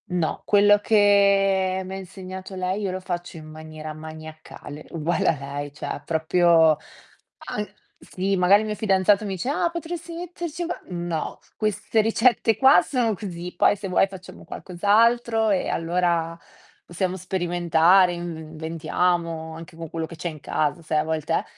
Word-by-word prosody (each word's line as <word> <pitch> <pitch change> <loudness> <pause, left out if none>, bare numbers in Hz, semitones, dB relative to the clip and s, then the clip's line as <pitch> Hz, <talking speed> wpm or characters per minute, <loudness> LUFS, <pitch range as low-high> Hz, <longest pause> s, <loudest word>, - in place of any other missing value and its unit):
No, 175 -3 -1
quello 205 0 +5
che 200 -3 +3
m'ha 190 +1 -6
insegnato 190 0 -8
lei 185 +2 -2
io 195 -2 -1
lo 185 - -4
faccio 175 -2 -5
in 155 - -10
maniera 155 0 -9
maniacale, 155 -1 -10
uguale 165 +1 -1
a 155 - +1
lei, 140 +1 -5
cioè 150 - -8
ha - - -4
proprio 165 0 +4 0.7
an 210 -1 -4 0.2
sì, 195 +2 -2
magari 185 +3 +5
il 215 - -3
mio 215 - -2
fidanzato 200 -1 +2
mi 195 -2 -3
dice: 185 +7 -4
"Ah 335 +3 0
potresti 340 0 -6
metterci 345 -1 -5
qua" 345 - -4
"No, 175 -2 -3 0.2
queste 215 +1 0
ricette 225 0 +2
qua 265 +4 +6
sono 240 -5 0
così, 180 -3 -7
poi 205 - +4
se 200 -1 -6
vuoi 180 +1 +3
facciamo 190 -1 -12
qualcos'altro 225 +4 +1
e 195 - +1
allora 170 -1 0 0.5
possiamo 180 +1 -2
sperimentare, 175 0 +3
inv 170 -1 -5
inventiamo 160 +1 -2
anche 160 0 -11
con 165 0 -7
quello 165 +1 -4
che 170 - -11
c'è 175 - -4
in 155 -3 -9
casa" 155 +4 -1
sai 155 -1 0
a 150 - +1
volte 160 0 -2
eh, - - 0
180 Hz, 160 wpm, -24 LUFS, 165-205 Hz, 0.7 s, qua